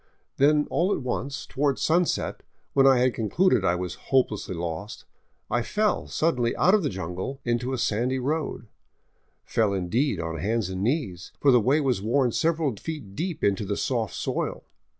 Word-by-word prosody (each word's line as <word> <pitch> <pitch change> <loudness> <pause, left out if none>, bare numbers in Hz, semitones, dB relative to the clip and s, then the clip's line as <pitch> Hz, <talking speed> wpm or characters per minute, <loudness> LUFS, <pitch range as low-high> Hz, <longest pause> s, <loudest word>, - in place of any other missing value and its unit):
Then 150 +2 +4
all 180 +4 +2
at 145 - -1
once, 135 +2 -3
toward 140 -1 0
sunset, 170 +2 +1 0.3
when 135 -1 +5
I 135 -1 +6
had 125 0 +3
concluded 120 - +2
I 85 -2 +2
was 90 -1 -3 0.2
hope 135 -2 +4
lessly 100 -3 -5
lost, 85 +5 -5 0.4
I 120 +1 0
fell 210 - 0
suddenly 125 -8 0
out 185 - +4
of 215 - +5
the 155 - 0
jungle 95 +8 -5
into 120 +2 0
a 130 - -1
sandy 120 +3 0
road, 145 0 -2 0.8
fell 110 -3 +1
in 90 -2 -3
deed 135 +8 +1
on 80 -1 -4
hands 110 -2 -1
and 95 0 -4
knees, 110 - -2
for 140 - +5
the 125 -2 +5
way 135 +8 +3
was 130 -8 0
worn 125 +4 +2
several 160 -3 +1
feet 140 -8 -7
deep 170 +1 -3
into 100 0 +2
the 100 0 -2
soft 115 -5 -1
soil. - - -3
125 Hz, 180 wpm, -26 LUFS, 100-145 Hz, 0.8 s, I